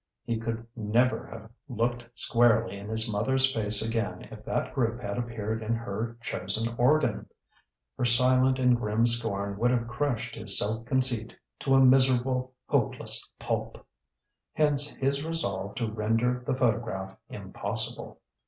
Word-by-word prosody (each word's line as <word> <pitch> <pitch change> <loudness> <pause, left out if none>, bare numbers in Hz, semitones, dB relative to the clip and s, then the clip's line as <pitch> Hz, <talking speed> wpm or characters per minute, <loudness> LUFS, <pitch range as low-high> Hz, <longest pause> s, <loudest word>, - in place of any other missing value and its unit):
He 115 -1 -2
could 115 0 -4
never 120 +3 0
have 110 0 -11 0.2
looked 120 0 -2
squarely 115 -4 +2
in 100 +1 -9
his 110 0 +4
mother's 130 +5 +1
face 105 -1 +2
again 110 -5 -3
if - - -11
that - - -2
group 120 -2 -1
had 100 -1 -4
appeared 110 -2 -4
in 110 +1 -1
her 115 +1 -5
chosen 110 +6 0
organ! 150 +6 +1 0.7
Her - - +1
silent 130 +2 +4
and 125 -1 +3
grim 110 0 0
scorn 100 -4 0
would 120 +2 +2
have 120 -2 0
crushed 120 0 -3
his - - +2
self 110 +3 -1
conceit 125 -4 +1 0.2
to 135 -1 +1
a 135 0 +6
miserable, 130 0 +2
hopeless - - 0
pulp. - - -4 0.7
Hence 145 -1 +2
his 140 +1 -1
resolve 165 +1 -1
to 115 -3 -3
render 115 +3 -1
the - - 0
photograph 110 -6 -2
impossible. - - -1
115 Hz, 145 wpm, -27 LUFS, 110-130 Hz, 0.7 s, a